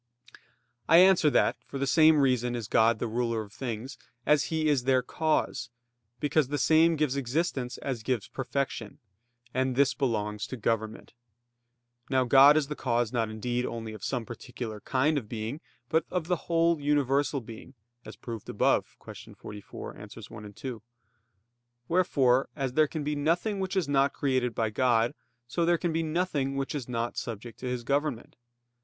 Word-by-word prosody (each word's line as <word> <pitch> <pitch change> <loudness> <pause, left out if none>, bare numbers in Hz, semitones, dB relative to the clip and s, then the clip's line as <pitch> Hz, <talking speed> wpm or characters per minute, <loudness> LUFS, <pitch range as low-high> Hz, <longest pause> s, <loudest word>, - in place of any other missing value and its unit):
I 165 - +8
answer 180 -3 +6
that, - - +2
For 140 - -6
the 135 - 0
same 155 +2 +5
reason 125 -2 +1
is 115 -3 -4
God 115 0 +3
the 120 - -3
ruler 115 -1 -1
of 105 -1 -15
things 120 0 -5 0.3
as 150 -1 +3
He 160 -1 -1
is 140 -5 +2
their 130 -1 +3
cause, 155 -5 -1 0.5
because 145 0 +1
the 145 +2 -2
same 160 +4 +4
gives 150 -3 0
existence 135 -1 -2
as 130 -4 -4
gives 115 -2 -2
perfection; 130 -4 -4 0.6
and 130 0 0
this 140 +1 +3
belongs 105 -6 -2
to 130 - -6
government. 110 -1 -2 1.0
Now 130 -1 +3
God 135 +4 +7
is 155 - +2
the 150 - -4
cause 120 -4 -1
not 115 -2 0
indeed 120 +3 -2
only 115 -2 -5
of 110 - -10
some 125 -4 -2
particular 120 -2 -7
kind 145 +6 +1
of 110 -5 -14
being, 115 +6 -5 0.3
but 160 +5 +2
of 180 -3 -2
the 175 -1 -2
whole 165 -1 +2
universal 140 -1 +1
being, 115 +3 -11 0.3
as - - -10
proved 115 -3 -8
above - - +1
(Q. - - -11
44, 105 -1 -9
AA. 105 - -9
1, 105 -1 -10
2). 125 0 -7 1.1
Wherefore, 135 -8 +2
as 135 -3 -2
there 155 +2 +4
can 155 0 -4
be 150 +1 -1
nothing 170 +8 0
which 190 0 -2
is 180 -6 +1
not 140 0 +2
created 130 -4 0
by 110 -1 0
God, 120 0 +2 0.3
so 170 +8 -1
there 170 +1 +3
can 170 -1 -2
be 165 - +1
nothing 155 -4 -1
which 135 0 -2
is 135 -5 -5
not 120 -1 -3
subject 115 +1 -6
to 130 - -5
His 125 -1 -3
government. 140 -2 -2
130 Hz, 175 wpm, -28 LUFS, 115-150 Hz, 1.1 s, I